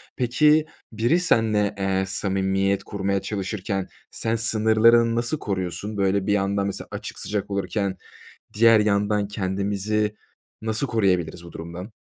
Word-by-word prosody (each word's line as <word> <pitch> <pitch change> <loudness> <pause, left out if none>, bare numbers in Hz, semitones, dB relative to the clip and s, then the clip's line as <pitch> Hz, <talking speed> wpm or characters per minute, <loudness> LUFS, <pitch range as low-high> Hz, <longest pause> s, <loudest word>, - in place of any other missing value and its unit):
Peki 150 +5 +3 0.3
biri 120 +10 +2
seninle, 110 - +2
eee, 95 -1 0
samimiyet 95 0 0
kurmaya 100 -1 -2
çalışırken 95 -1 -3 0.2
sen 115 0 -1
sınırlarını 115 +1 +4
nasıl 120 +6 -1
koruyorsun? 100 +2 -4
Böyle 95 0 +1
bir 105 - +3
yandan 100 0 0
mesela 100 - -5
açık, - - -6
sıcak 105 -1 -2
olurken 100 0 -2 0.6
diğer 115 +1 +6
yandan 105 0 +1
kendimizi 100 +1 -1 0.5
nasıl 110 +5 -1
koruyabiliriz 90 -7 0
bu 85 - -11
durumdan? 85 +6 -8
100 Hz, 125 wpm, -24 LUFS, 95-110 Hz, 0.6 s, diğer